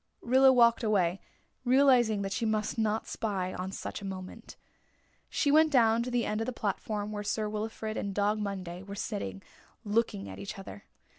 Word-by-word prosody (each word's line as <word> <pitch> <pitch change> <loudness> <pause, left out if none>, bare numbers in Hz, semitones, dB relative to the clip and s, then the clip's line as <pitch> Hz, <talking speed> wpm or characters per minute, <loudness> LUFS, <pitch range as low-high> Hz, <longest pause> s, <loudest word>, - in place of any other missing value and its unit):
Rilla 260 +2 +6
walked 235 -1 +4
away, 195 -4 +1 0.4
realising 245 -5 +4
that 195 - -3
she 205 - -2
must 215 -1 0
not 220 -1 0
spy 190 -4 -3
on 185 +1 -4
such 195 - -6
a - - -10
moment. 190 -1 -8 0.7
She 285 - +1
went 310 +1 +5
down 230 -4 +4
to 245 - -3
the 245 -1 0
end 215 +1 -1
of 225 - -2
the - - -1
platform 210 0 -3
where 205 -1 -4
Sir 215 +1 -1
Wilfrid 215 +1 -4
and 200 - -2
Dog 205 +2 +1
Monday 185 -4 -4
were 200 +1 -8
sitting, 195 - -4 0.4
looking 210 - 0
at 95 0 -8
each 100 - -6
other. 195 +1 -10
210 Hz, 180 wpm, -30 LUFS, 195-230 Hz, 0.7 s, Rilla